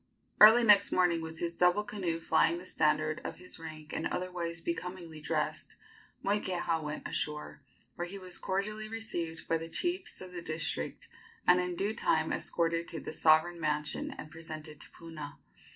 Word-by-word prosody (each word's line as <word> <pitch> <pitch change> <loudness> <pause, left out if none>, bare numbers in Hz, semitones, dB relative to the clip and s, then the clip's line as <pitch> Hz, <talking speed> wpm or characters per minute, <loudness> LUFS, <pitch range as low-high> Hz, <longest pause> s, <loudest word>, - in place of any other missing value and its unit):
Early 220 +3 +10
next 205 -3 +6
morning, 175 -2 +3
with 160 0 -6
his 170 0 -2
double 180 +4 +3
canoe 190 -6 -2
flying 165 0 +3
the 180 - -9
standard 155 -2 +1
of - - -4
his 180 -1 -8
rank 155 -2 -9
and - - -1
otherwise 175 -2 -3
becomingly 170 -2 -5
dressed, - - -2 0.5
Moikeha 185 -5 0
went 150 0 -4
ashore, 150 -1 -4 0.3
where 175 - -4
he 195 +3 -7
was 185 -2 -5
cordially 210 +3 -2
received 175 -8 -3
by 165 - +2
the 165 +1 -6
chiefs 355 - -1
of 185 -1 -9
the 175 - -5
district, 155 -1 -3 0.4
and 180 0 +6
in 180 0 -2
due 200 +4 0
time 160 -8 +1
escorted 170 0 0
to 165 - -3
the - - -6
sovereign 160 +2 +4
mansion 150 -1 -1
and 155 - -8
presented 155 -2 -8
to - - -9
Puna. 155 -3 -9
170 Hz, 170 wpm, -32 LUFS, 160-185 Hz, 0.5 s, Early